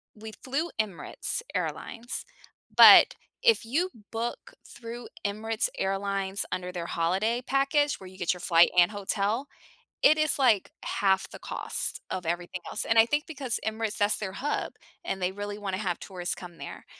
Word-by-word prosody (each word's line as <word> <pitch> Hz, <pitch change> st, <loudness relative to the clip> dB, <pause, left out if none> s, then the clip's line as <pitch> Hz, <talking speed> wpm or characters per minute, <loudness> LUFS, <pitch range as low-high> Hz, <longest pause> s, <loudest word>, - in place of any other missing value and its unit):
we 220 Hz, 0 st, -9 dB
flew 285 Hz, +6 st, -1 dB
Emirates 205 Hz, -, -4 dB
Airlines, 235 Hz, +2 st, -4 dB, 0.5 s
but -, -, +9 dB, 0.3 s
if 465 Hz, -, +4 dB
you 320 Hz, +11 st, 0 dB, 0.2 s
book 235 Hz, +1 st, -4 dB
through 235 Hz, 0 st, -9 dB, 0.2 s
Emirates 220 Hz, -, -1 dB
Airlines 195 Hz, 0 st, -1 dB
under 180 Hz, 0 st, -3 dB
their 175 Hz, -2 st, -5 dB
holiday 190 Hz, +9 st, 0 dB
package 290 Hz, +2 st, +2 dB
where 190 Hz, -, -10 dB
you 185 Hz, 0 st, -13 dB
get 180 Hz, -2 st, +1 dB
your 180 Hz, -, -10 dB
flight 170 Hz, -1 st, +5 dB
and 175 Hz, +2 st, +6 dB
hotel, 205 Hz, +5 st, -1 dB, 0.6 s
it 310 Hz, -, +6 dB
is, 310 Hz, -1 st, +3 dB
like, 235 Hz, -8 st, +3 dB
half 190 Hz, -1 st, +1 dB
the -, -, -9 dB
cost -, -, -4 dB
of 180 Hz, -2 st, -4 dB
everything 175 Hz, +2 st, -3 dB
else, -, -, -3 dB
and 225 Hz, -, +2 dB
I 225 Hz, -, +8 dB
think 295 Hz, +4 st, 0 dB
because 275 Hz, -6 st, -3 dB
Emirates 220 Hz, -1 st, -2 dB
that's 205 Hz, +1 st, +2 dB
their 200 Hz, -3 st, -4 dB
hub, 290 Hz, +9 st, -2 dB, 0.3 s
and 195 Hz, -, -3 dB
they 180 Hz, +1 st, +1 dB
really 205 Hz, +1 st, -5 dB
wanna 195 Hz, -2 st, -3 dB
have 185 Hz, -4 st, -2 dB
tourists 180 Hz, -2 st, -4 dB
come 175 Hz, -2 st, -11 dB
there, -, -, -9 dB
205 Hz, 165 wpm, -28 LUFS, 185-240 Hz, 0.6 s, but